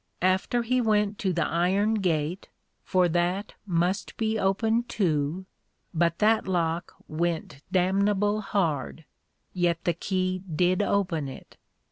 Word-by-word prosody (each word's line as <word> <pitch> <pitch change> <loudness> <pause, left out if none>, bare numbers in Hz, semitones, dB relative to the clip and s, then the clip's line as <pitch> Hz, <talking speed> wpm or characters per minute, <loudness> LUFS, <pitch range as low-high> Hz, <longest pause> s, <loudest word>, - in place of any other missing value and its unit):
After 190 +6 +2
he 250 +2 +1
went 210 -2 +1
to 190 - 0
the 170 -1 0
iron 190 +6 +1
Gate, 175 -3 -1 0.3
for 185 -1 +2
that 175 +4 0
must 180 +2 -1
be 220 -1 0
opened 225 +5 +1
too, 165 -1 0 0.5
but 170 0 +1
that 215 0 +3
Lock 170 -1 -1
went 160 -3 -2
damnable 200 +3 +2
hard, 165 - -1 0.5
yet 175 -2 0
the 175 - +1
Key 185 +1 -1
did 180 +4 +2
open 180 -8 0
it. 130 - -12
185 Hz, 125 wpm, -27 LUFS, 170-205 Hz, 0.5 s, that